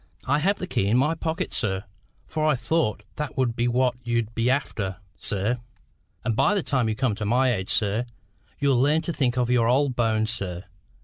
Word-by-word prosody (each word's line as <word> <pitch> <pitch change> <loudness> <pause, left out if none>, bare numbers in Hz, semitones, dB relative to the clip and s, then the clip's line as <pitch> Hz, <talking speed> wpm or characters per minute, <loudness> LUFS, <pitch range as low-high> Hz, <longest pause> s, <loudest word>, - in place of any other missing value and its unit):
"I 145 +3 +2
have 195 +6 +2
the - - -4
key 100 - 0
in 110 +4 +3
my 150 +5 +3
pocket, 165 0 -3
sir; 95 -3 -1 0.4
for 155 -1 -3
I 155 -2 +4
thought 125 -1 0
that 150 -1 -4
would 125 -3 +1
be 120 0 +1
what 125 +1 +2
you'd 115 -2 -1
be 115 +2 +1
after, 105 -8 -1 0.2
sir. 105 +5 -1 0.7
And 115 - +1
by 205 - +3
the 195 - +1
time 125 -5 +1
you 110 - -1
come 125 -1 +1
to 110 +2 -5
my 125 +4 +3
age, 95 -2 -3
sir, 105 +3 +1 0.5
you'll 135 -3 +3
learn 150 +4 +3
to 170 - -2
think 130 -5 0
of 125 -1 +1
your 120 -2 +3
old 130 +1 +2
bones, 110 -2 +1
sir. 95 -5 -4
120 Hz, 205 wpm, -25 LUFS, 110-140 Hz, 0.7 s, I